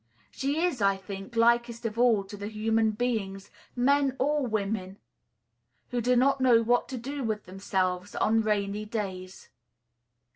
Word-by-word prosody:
She 285 +5 -1
is, 345 -10 0
I 195 -1 +3
think, 195 +3 -8
likest 235 0 +2
of 225 +1 -3
all 235 -5 +4
to 195 +1 -10
the 205 0 -6
human 220 +1 +1
beings, 210 -4 -3 0.2
men 275 +2 +2
or 290 0 +1
women, 200 -3 -2 0.9
who 245 -1 0
do 250 +2 +2
not 270 +2 +3
know 240 -3 +5
what 240 +2 +2
to 260 - -5
do 275 +4 -5
with 215 -2 -2
themselves 185 0 -2
on 225 +1 +2
rainy 210 -1 -1
days. 190 -4 -6
225 Hz, 150 wpm, -28 LUFS, 200-245 Hz, 0.9 s, know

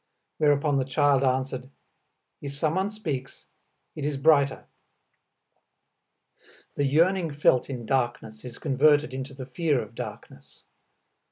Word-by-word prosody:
Whereupon 145 -1 +2
the - - +1
child 140 0 +2
answered, 130 0 -1 0.7
"If 140 -1 -7
someone 170 +7 0
speaks, 155 -12 -6 0.5
it 150 - -6
is 145 -1 -1
brighter." 140 -1 +3 2.1
The 145 - 0
yearning 165 +5 +2
felt 145 -3 +2
in 125 -4 -5
darkness 120 -4 -2
is 125 -2 -9
converted 145 +1 +3
into 135 +1 -6
the 130 -1 -7
fear 145 +2 0
of 110 0 -7
darkness. - - -10
140 Hz, 115 wpm, -26 LUFS, 130-150 Hz, 2.1 s, brighter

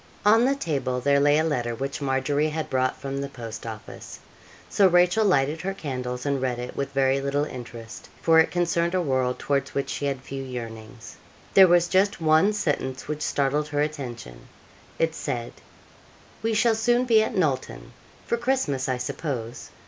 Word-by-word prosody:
On 225 +3 +6
the 275 +1 +2
table 135 - -2
there 140 +2 +3
lay 145 +1 +4
a 155 - +2
letter 120 -7 -1
which 135 +4 -4
Margery 140 +3 0
had 155 0 -4
brought 130 0 0
from 140 0 -4
the 140 - -4
post 115 -4 -8
office. 110 -3 -9 0.5
So 195 - +4
Rachel 180 +4 +4
lighted 155 -5 +2
her 195 +3 -3
candles 125 -6 -5
and 140 -2 0
read 125 -2 -1
it 125 0 -6
with 140 0 -3
very 135 0 +2
little 140 +1 0
interest, 120 -4 -9
for 165 -1 +5
it 160 - +4
concerned 170 0 0
a 185 - +2
world 130 -3 0
towards 140 -1 -2
which 140 - -1
she 145 - -3
had 135 -2 -3
few 135 0 -6
yearnings. 115 -3 -8 0.4
There 190 -1 +8
was 175 0 +4
just 190 +2 +2
one 160 +5 +4
sentence 135 -9 -2
which 150 0 -4
startled 145 +1 0
her 145 0 -1
attention: 120 - -6 0.5
it 165 -1 +1
said, 125 -7 -4 0.9
'We 225 0 0
shall 225 +2 +3
soon 240 +3 +2
be 225 -3 +5
at 220 - -2
Knowlton 150 -8 -2 0.3
for 235 - 0
Christmas, 235 - -1
I 130 - 0
suppose. 125 -2 -5
140 Hz, 180 wpm, -25 LUFS, 130-170 Hz, 0.9 s, There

